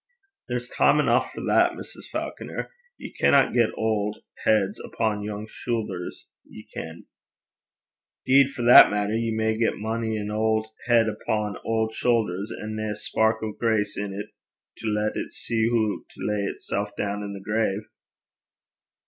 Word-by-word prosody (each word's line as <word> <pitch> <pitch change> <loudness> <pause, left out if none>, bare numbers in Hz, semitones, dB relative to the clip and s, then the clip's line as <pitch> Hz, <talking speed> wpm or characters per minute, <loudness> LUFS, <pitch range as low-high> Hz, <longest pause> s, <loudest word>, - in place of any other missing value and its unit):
'There's - - -2
time - - +3
eneuch - - +2
for - - -7
that, - - +3
Mrs. - - -10
Faukner. - - -5 0.3
Ye - - -9
canna 140 -1 +4
get 115 -2 +3
auld 105 -1 0 0.3
heids 105 -2 +2
upo' 110 -2 -1
young 105 0 -5
shoothers, 105 -7 -4 0.2
ye - - -13
ken.' 80 +1 -7 1.2
''Deed 135 +1 +6
for 130 -3 -5
that 120 +1 +10
maitter, 105 +1 0
ye 115 0 0
may 110 0 +1
get 115 0 +1
mony 110 0 -2
an 105 0 -4
auld 110 0 +1 0.2
heid 115 -2 +5
upo' 105 -1 -2
auld 110 0 0
shoothers, 110 -5 0
and 110 0 -6
nae 110 0 -2
a 105 - -2
spark 110 +2 0
o' 110 - -2
grace 105 -2 0
in 100 0 -3
't 100 +1 -6 0.5
to - - -5
lat 105 0 0
it - - -4
see 115 -1 0
hoo 110 -3 0
to - - -8
lay 105 -1 0
itsel' 100 +1 -3
doon 105 0 -2
i' 100 -1 -5
the 100 - -7
grave.' 105 0 -1
110 Hz, 160 wpm, -25 LUFS, 105-110 Hz, 1.2 s, that